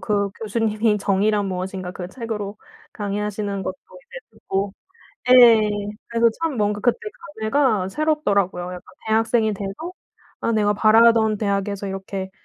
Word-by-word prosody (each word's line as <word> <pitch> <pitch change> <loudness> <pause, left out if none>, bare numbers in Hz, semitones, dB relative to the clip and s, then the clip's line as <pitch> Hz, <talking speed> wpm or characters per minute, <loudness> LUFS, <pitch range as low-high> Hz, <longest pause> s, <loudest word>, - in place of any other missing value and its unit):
그 200 -2 0
교수님이 215 -1 0
정의란 200 +1 +1
무엇인가 185 0 -4
그 180 -1 -7
책으로 210 -3 -5 0.4
강의하시는 205 -1 -3
것도 185 - -3 0.3
이제 - - -9
듣고 195 +1 -3 0.6
예. 240 -3 +9 0.5
그래서 235 0 +3
참 325 -6 -1
뭔가 210 -1 0
그때 245 - +2 0.4
감회가 220 -5 +1
새롭더라고요. 200 - 0
약간 180 -1 -7 0.3
대학생이 225 0 +2
돼서 200 - -6 0.5
아 230 - 0
내가 210 -1 +2
바라던 220 0 +5
대학에서 200 -1 -2
이렇게 190 0 -5
210 Hz, 320 characters per minute, -22 LUFS, 195-225 Hz, 0.6 s, 예